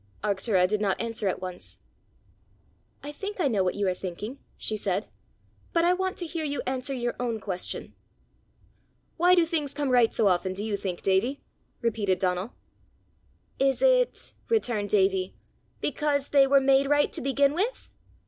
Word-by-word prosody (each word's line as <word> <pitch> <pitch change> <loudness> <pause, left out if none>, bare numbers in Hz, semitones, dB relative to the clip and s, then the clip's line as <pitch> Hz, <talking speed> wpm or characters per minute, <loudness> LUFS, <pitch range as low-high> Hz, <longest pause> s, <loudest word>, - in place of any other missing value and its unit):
Arctura 195 -2 +2
did 210 +2 -1
not 195 -2 0
answer 230 -2 -2
at 185 - -1
once. 180 -1 -7 1.3
"I 290 - -5
think 400 +7 -6
I 325 - +3
know 210 -7 +1
what 180 - 0
you 205 -1 0
are 185 - +2
thinking," 195 +8 -6 0.2
she 215 - -1
said, 200 0 -1 0.7
"but 335 0 +3
I 355 - +5
want 375 0 -2
to 350 - -4
hear 330 0 -4
you 285 -1 -2
answer 260 +1 -3
your 240 -1 -2
own 235 -3 -1
question." 185 -3 -4 1.2
"Why 355 +2 +5
do 345 -2 +4
things 310 -4 -2
come 285 -3 -1
right 245 -2 +5
so 220 - +2
often, 185 0 +1
do 200 - -4
you 215 -2 -1
think, 185 -3 -4
Davie?" 205 +9 +1 0.4
repeated 205 -5 +1
Donal. 185 +4 -1 1.0
"Is 270 - +2
it," - - +2 0.2
returned 240 - 0
Davie, 190 -2 +2 0.5
"because 290 -1 0
they 275 -1 +5
were 275 0 +6
made 270 0 +4
right 290 0 +3
to - - -4
begin 275 +1 +2
with?" 420 +10 -2
240 Hz, 165 wpm, -27 LUFS, 195-290 Hz, 1.3 s, were